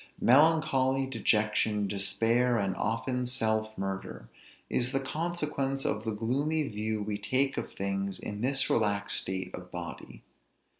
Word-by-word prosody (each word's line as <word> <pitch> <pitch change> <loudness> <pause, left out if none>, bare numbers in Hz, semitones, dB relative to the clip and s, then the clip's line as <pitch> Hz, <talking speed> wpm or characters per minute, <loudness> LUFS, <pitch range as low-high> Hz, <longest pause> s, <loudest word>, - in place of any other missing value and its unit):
Melancholy, 135 -1 +4
dejection, 110 -4 +1
despair, 115 +5 +1
and 100 -3 0
often 125 +3 -1
self 110 -3 0
murder, 95 -10 -5 0.4
is 125 +2 0
the 135 - +2
consequence 150 -2 -2
of 110 +1 -1
the 110 - 0
gloomy 140 +8 0
view 110 -1 -2
we 105 0 -3
take 130 +6 +1
of - - -4
things 100 0 -2
in 105 0 -6
this 135 +2 +2
relaxed 100 -2 +2
state 95 -1 -4
of 90 0 -8
body. 85 -2 -8
110 Hz, 135 wpm, -30 LUFS, 100-135 Hz, 0.4 s, Melancholy